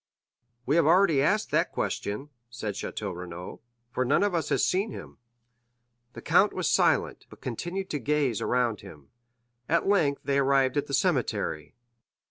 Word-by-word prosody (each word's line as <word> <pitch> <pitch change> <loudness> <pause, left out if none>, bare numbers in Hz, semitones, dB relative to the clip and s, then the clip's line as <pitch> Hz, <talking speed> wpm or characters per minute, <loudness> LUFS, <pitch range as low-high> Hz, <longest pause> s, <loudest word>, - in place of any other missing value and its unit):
"We 145 +5 +2
have 165 - +4
already 170 -4 +4
asked 205 +9 +1
that - - +1
question," 120 +9 -3 0.2
said 115 -3 -5
Château 95 - -5
Renaud, 90 0 -8 0.3
"for 130 - 0
none 145 +9 +2
of 205 -2 +1
us 165 -2 -1
has - - +2
seen 195 +4 0
him." - - -10 0.9
The - - -10
count - - +4
was - - -1
silent, - - +1
but - - -15
continued 175 - -5
to 150 - -2
gaze 140 -3 0
around 120 -4 0
him. 75 -8 -14 0.6
At 170 +2 +2
length 160 -9 +2
they 140 0 +1
arrived 135 -1 +2
at 145 - -1
the 140 - 0
cemetery. 120 - -1
140 Hz, 160 wpm, -27 LUFS, 115-170 Hz, 0.9 s, have